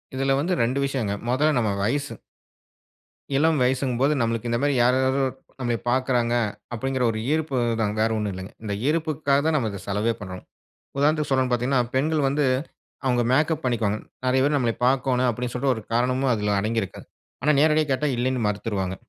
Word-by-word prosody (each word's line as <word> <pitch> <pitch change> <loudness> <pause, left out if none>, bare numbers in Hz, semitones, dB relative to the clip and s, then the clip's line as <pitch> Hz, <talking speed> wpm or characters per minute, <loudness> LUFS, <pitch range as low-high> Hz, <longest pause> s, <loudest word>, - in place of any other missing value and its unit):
இதுல 135 +1 0
வந்து 180 +5 0
2 130 +4 0
விஷயங்க. 125 -7 -1 0.2
மொத 150 +5 +3
நம்ம 110 -3 +1
வயசு. 145 +6 -1 1.2
இளம் 160 -1 +3
வயசுங்கும் 130 -1 0
போது 145 +2 +4
நம்ளுக்கு 115 0 -1
இந்த 120 - +1
மாரி, 145 -1 +2
யார் 125 +1 +4
யாரோ 135 +1 +2 0.3
நம்மை 120 -2 0
பாக்கிறாங்க? 125 -2 +1 0.4
அப்டிங்குற 130 +2 -1
ஒரு 110 - -4
ஈர்ப்பு 155 -4 -1 0.2
தான். 105 -1 0
வேற 110 +1 +3
ஒண்ணும் 105 -2 -2
இல்லங்க. 95 +1 -8
இந்த 105 -2 -3
ஈர்ப்புக்காக 155 -3 +1
தான் 160 - +2
நம்ம 115 -5 0
இத 100 - -7
செலவே 105 +4 0
பண்றோம். 95 -2 -7 0.5
உதாரணத்துக்கு 150 +1 +2
சொல்லனும்னு 130 -1 +2
பாத்தீங்கன்னா, 125 +1 +2
பெண்கள் 150 +1 +1
வந்து, 145 0 +1 0.6
அவுங்க 125 -2 +2
மேக்கப் 155 +2 +1
பண்ணிக்குவாங்க. 110 -4 0 0.3
நிறைய 130 +1 +3
பேரு 145 0 +2
நம்ளைய 120 -4 0
பாக்கோணும், 130 -1 +2
அப்டின்னு 120 +1 -3
சொல்ட்டு 130 +1 +1
ஒரு 110 - -7
காரணமும் 125 +2 +1
அதில 105 -1 0
அடங்கி 110 +2 0
இருக்கு. 95 - -9 0.4
ஆனா 150 - +4
நேரடியா 155 0 +4
கேட்டா, 130 +3 +1
இல்லைன்னு 125 -2 0
மருத்துருவாங்க. 100 -3 -2
130 Hz, 175 wpm, -24 LUFS, 115-140 Hz, 1.2 s, போது